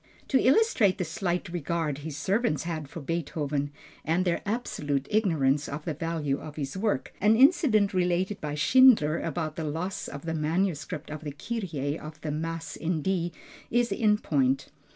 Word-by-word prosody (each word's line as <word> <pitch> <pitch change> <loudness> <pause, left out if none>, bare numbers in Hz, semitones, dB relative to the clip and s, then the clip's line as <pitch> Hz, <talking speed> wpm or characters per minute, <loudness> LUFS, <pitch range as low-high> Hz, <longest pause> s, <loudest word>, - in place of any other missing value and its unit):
To 265 - +4
illustrate 260 - +4
the - - -1
slight 175 +1 -2
regard 165 -3 -2
his 150 -1 -6
servants 190 - 0
had 160 -4 -4
for 165 - -7
Beethoven 145 -2 -2 0.3
and 170 +4 +1
their 175 -2 +1
absolute 145 - -2
ignorance 150 -9 +2
of 150 +2 -6
the 160 - -1
value 155 -3 -2
of 150 -1 -9
his 140 -2 -4
work, 210 +2 -1
an 215 +2 +5
incident 245 - +4
related 185 +2 0
by 150 -1 -3
Schindler 190 - +5
about 155 -3 -3
the 165 - -2
loss 165 +6 -3
of 140 +2 -8
the 165 - -2
manuscript 155 -1 -1
of 155 0 -6
the 150 - -4
Kyrie 160 - -3
of 155 0 -9
the 155 - -3
Mass 165 +2 -4
in 160 -2 -2
D 175 -3 0 0.4
is 240 0 +1
in 210 -2 +3
point. 135 -8 +1
165 Hz, 170 wpm, -28 LUFS, 150-195 Hz, 0.4 s, an